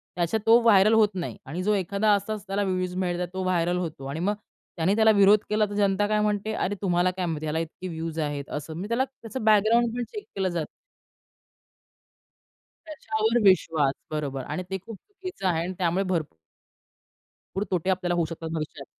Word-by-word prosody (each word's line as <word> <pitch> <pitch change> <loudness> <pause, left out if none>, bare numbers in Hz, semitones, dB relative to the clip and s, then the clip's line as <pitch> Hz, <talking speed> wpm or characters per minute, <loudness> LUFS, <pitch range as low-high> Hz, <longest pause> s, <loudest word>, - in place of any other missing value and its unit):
त्याच्या 175 +5 0
तो 230 +2 +7
व्हायरल 215 -1 +5
होत 220 -2 +5
नाही 180 -3 -4
आणि 175 +3 -4
जो 210 +1 +2
एखादा 200 +2 +1
असाच 205 0 -2
त्याला 200 +1 0
व्ह्यूज 185 -1 -1
मिळतात, 180 -1 -1
तो 190 0 -3
व्हायरल 175 -1 +1
होतो 160 -6 -4
आणि 140 +4 -4
मग 200 +4 +1 0.4
त्याने 180 +5 +2
त्याला 220 0 +5
विरोध 200 0 +6
केला, 215 0 +2
तर - - -6
जनता 205 0 +2
काय 215 0 +1
म्हणते? 210 0 0
"अरे! 205 - -1
तुम्हाला 180 -1 +2
काय 185 0 -3
माहिती 155 -2 -3
आहे? - - -3
याला 160 +2 -1
इतके 165 +3 -6
व्ह्यूज 165 -1 -4
आहेत" 145 -2 -3
असं. 150 +2 -5
मग 190 - -4
त्याला 240 +3 +1
त्याचं 260 -2 -8
बॅकग्राऊंड 220 +2 +4
पण 245 - -1
चेक 420 -1 -5
केलं 190 -1 0
जातं. 170 -3 -2 2.2
त्याच्यावर 225 -6 0
विश्वास. 155 -6 +2 0.2
बरोबर 140 -4 -3
आणि 155 +8 -4
ते 190 - -2
खूप 225 -3 -8
चुकीचं 370 - -6
आहे 165 -2 +1
आणि 185 +2 -4
त्यामुळे 180 +2 +1
भर 165 - +2 1.3
पूर 195 - 0
तोटे 180 0 0
आपल्याला 180 -2 0
होऊ 170 - +1
शकतात 165 0 -6
भविष्यात. 155 -3 -5
185 Hz, 190 wpm, -26 LUFS, 165-210 Hz, 2.2 s, तो